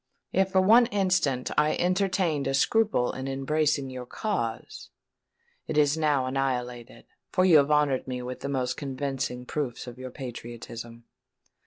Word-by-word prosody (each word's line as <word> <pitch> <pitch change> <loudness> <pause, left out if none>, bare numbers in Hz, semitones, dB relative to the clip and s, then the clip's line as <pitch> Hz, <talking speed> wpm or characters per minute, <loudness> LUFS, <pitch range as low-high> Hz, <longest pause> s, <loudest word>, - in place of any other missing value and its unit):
"If 190 0 +1
for 190 - +5
one 230 +5 +6
instant 185 - 0
I 150 +1 +2
entertained 185 -5 +1
a 135 - +1
scruple 210 - +2
in 130 +1 -6
embracing 140 0 0
your 125 -1 -7
cause, 120 - -4 0.8
it - - -2
is 145 0 +4
now 150 -4 +1
annihilated; 125 -3 -3 0.3
for 185 -2 +3
you 170 -4 +7
have 140 0 +3
honoured 150 -4 +2
me 125 -1 -4
with 125 +1 -6
the 140 - -5
most 130 -2 -1
convincing 135 -2 -3
proofs 135 -3 -3
of 125 0 -10
your 130 0 -6
patriotism." 120 -2 -8
135 Hz, 150 wpm, -27 LUFS, 125-155 Hz, 0.8 s, you